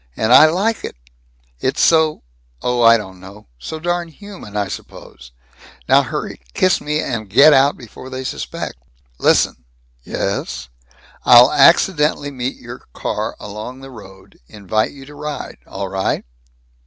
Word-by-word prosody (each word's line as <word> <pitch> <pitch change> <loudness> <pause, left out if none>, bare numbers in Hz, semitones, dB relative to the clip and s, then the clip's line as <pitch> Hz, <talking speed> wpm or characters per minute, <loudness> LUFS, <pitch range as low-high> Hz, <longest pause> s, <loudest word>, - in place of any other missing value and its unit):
And 110 +2 +2
I 155 - +9
like 200 +7 -1
it! - - -6 0.6
It's 130 - -2
so 160 - +3 0.4
oh, 125 0 0
I 115 0 +7
don't 95 -4 -9
know 100 +3 -13
so 160 - -7
darn 175 +1 -2
human, 170 - -10
I 100 -1 -1
suppose. 60 -8 -11 0.6
Now - - +5
hurry - - -6
kiss 185 -1 +2
me, 150 +1 -2
and 110 -5 -4
get 145 +9 +7
out, 140 +1 +3
before 125 +2 -12
they 130 0 -6
suspect." 125 - -5 0.4
"Listen." 60 - +2 0.4
"Yes?" 60 - -4 0.5
"I'll 125 +2 +8
accidentally 150 0 +3
meet 130 -1 -4
your 120 +1 -12
car - - -4
along 110 +6 -8
the 135 0 -11
road. 95 -5 -15
Invite 105 +1 -2
you 135 -1 -13
to 145 - -13
ride. 150 0 -7
All - - -5
right?" - - -2
130 Hz, 145 wpm, -18 LUFS, 110-150 Hz, 0.6 s, I